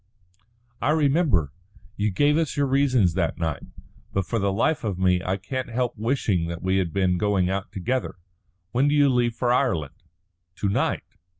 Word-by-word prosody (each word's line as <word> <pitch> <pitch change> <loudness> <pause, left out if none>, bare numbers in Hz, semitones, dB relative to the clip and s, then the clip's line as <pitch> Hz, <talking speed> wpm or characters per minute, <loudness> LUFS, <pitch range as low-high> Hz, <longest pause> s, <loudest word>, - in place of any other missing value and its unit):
"I 130 - +1
remember. 140 - +2 0.4
You 105 +1 0
gave 145 +10 +2
us 160 -3 -1
your 145 - +3
reasons 130 -9 +2
that 85 -3 -1
night. 80 -4 -2 0.5
But 95 -1 -1
for 115 - -1
the 100 -1 +1
life 135 +10 0
of 100 -5 -2
me 90 -1 +2
I 95 +1 -1
can't 130 +6 -5
help 120 +1 -1
wishing 110 -7 0
that 85 +1 -6
we 95 +1 +1
had 90 -4 0
been 90 -1 +1
going 100 -3 +1
out 100 0 -3
together. 125 +7 -2 0.6
When 130 +6 +2
do 145 - +2
you 145 -1 +5
leave 120 -2 +1
for 120 0 +1
Ireland?" 85 - 0 0.6
"To 100 - -1
night." 100 - 0
105 Hz, 180 wpm, -24 LUFS, 95-130 Hz, 0.6 s, you